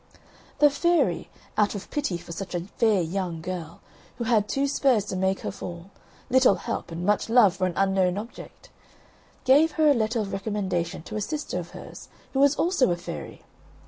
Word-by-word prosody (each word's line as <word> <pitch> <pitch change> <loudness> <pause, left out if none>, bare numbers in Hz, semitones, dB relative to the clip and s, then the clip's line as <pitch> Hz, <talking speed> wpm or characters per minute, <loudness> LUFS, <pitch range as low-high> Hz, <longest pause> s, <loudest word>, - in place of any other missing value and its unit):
The 295 -1 +6
fairy, 290 - +1 0.3
out 210 0 +2
of 200 - -8
pity 285 -12 -1
for 170 - -11
such 185 +2 -5
a 175 - -1
fair 205 +1 +1
young 175 0 -3
girl, 170 -1 -6 0.4
who 240 - -3
had 220 -3 +2
two 275 +1 +1
spurs 265 -6 +2
to 190 - -4
make 190 +1 0
her - - -3
fall 175 -1 -8 0.4
little 260 -5 +5
help 175 - -4
and 170 +2 -4
much 210 +2 +1
love 225 -6 +5
for 185 - +1
an 180 - -3
unknown 190 -1 +2
object 225 +4 -9 0.7
gave 295 +4 +5
her 310 -2 +4
a - - +6
letter 230 -1 0
of 200 -2 -3
recommendation 190 -4 -2
to 215 - -6
a - - -2
sister 305 +8 -3
of - - -7
hers, - - -11 0.2
who 270 - 0
was 280 +1 +5
also 340 - +2
a 175 - 0
fairy. 175 - -8
205 Hz, 190 wpm, -26 LUFS, 185-260 Hz, 0.7 s, The